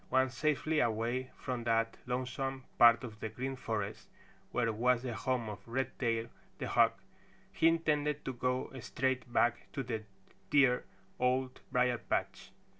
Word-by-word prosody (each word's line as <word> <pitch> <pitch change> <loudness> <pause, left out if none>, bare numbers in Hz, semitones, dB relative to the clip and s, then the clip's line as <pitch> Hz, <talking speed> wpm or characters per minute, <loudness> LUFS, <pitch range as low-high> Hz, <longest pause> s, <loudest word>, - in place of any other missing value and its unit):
Once 130 0 +3
safely 155 +2 +1
away 120 +2 0
from 125 -2 -4
that 115 0 +1
lonesome 130 +1 -2 0.2
part 120 +1 +8
of 110 -4 -8
the 110 - -3
Green 130 +4 -4
Forest 110 -5 -4 0.4
where 115 -2 +1
was 125 +2 +2
the 125 -2 -3
home 120 +1 -1
of 105 -1 -5
Redtail 120 -2 -1 0.3
the - - -3
Hawk, - - +3 0.5
he 165 - +3
intended 150 -3 +1
to 130 - -2
go 125 +1 -1
straight 130 +1 -1
back 120 0 +1
to 135 - -2
the 115 -3 -3 0.5
dear 130 -4 +4 0.3
Old 130 +1 +1
Briar 125 -2 +2
patch. - - -2
125 Hz, 145 wpm, -33 LUFS, 115-130 Hz, 0.5 s, part